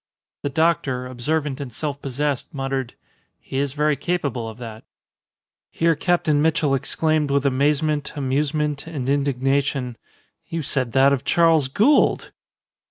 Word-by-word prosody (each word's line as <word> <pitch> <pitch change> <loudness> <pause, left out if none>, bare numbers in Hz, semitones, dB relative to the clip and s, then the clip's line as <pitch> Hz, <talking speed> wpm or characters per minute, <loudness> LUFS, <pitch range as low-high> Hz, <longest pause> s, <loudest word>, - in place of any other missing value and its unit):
The 145 - -2
doctor, 140 -4 +1
observant 140 +3 -2
and 135 -3 -6
self 145 +3 -4
possessed, 140 0 -2
muttered, 135 -2 -3 0.4
"He 130 - -6
is 140 -1 -1
very 150 0 +1
capable 140 -7 -2
of 110 - -10
that." 115 -2 -9 0.9
Here 165 0 +2
Captain 155 -2 +1
Mitchell 155 -2 +2
exclaimed 150 +2 0
with 140 0 +1
amazement, 145 +2 +1
amusement, 145 +2 -1
and 145 -6 -4
indignation, 135 -2 0 0.5
"You 165 -1 -3
said 130 -4 -1
that 135 +1 +5
of 135 - -1
Charles 165 -4 +3
Gould!" 225 - +3
140 Hz, 130 wpm, -22 LUFS, 135-150 Hz, 0.9 s, that